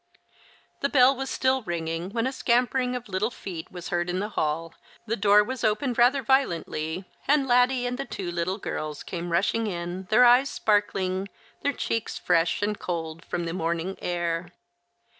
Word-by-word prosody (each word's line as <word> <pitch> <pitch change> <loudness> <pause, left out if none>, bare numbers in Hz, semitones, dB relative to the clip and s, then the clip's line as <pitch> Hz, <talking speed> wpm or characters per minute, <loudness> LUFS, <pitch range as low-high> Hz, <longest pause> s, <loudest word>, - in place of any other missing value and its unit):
The 280 - 0
bell 265 -1 +5
was 270 +1 -4
still 260 0 +1
ringing 170 -2 -3
when 230 +3 -1
a 260 - 0
scampering 250 0 +1
of 245 -1 -5
little 200 +3 0
feet 180 -8 -8
was 180 -1 -7
heard 175 0 -1
in 180 - -1
the 205 +2 -2
hall, 165 -3 -2 0.3
the 230 0 -1
door 205 0 +5
was 255 +2 -5
opened 240 +3 +1
rather 260 +3 +4
violently, 180 - 0 0.2
and 285 -1 +3
Laddie 250 0 +3
and 250 +1 -3
the 275 - -2
two 185 -8 -5
little 175 +3 -1
girls 155 -7 -5
came 175 -1 -5
rushing 215 +6 +1
in, 175 0 -4
their 245 +4 +6
eyes 250 +3 +6
sparkling, 195 -2 0 0.3
their 285 - +1
cheeks 230 -3 -2
fresh 165 +4 +1
and 210 0 -1
cold 165 -1 -4
from 175 - -3
the 165 - -3
morning 170 +2 -2
air. 175 -1 -1
200 Hz, 175 wpm, -26 LUFS, 175-245 Hz, 0.3 s, their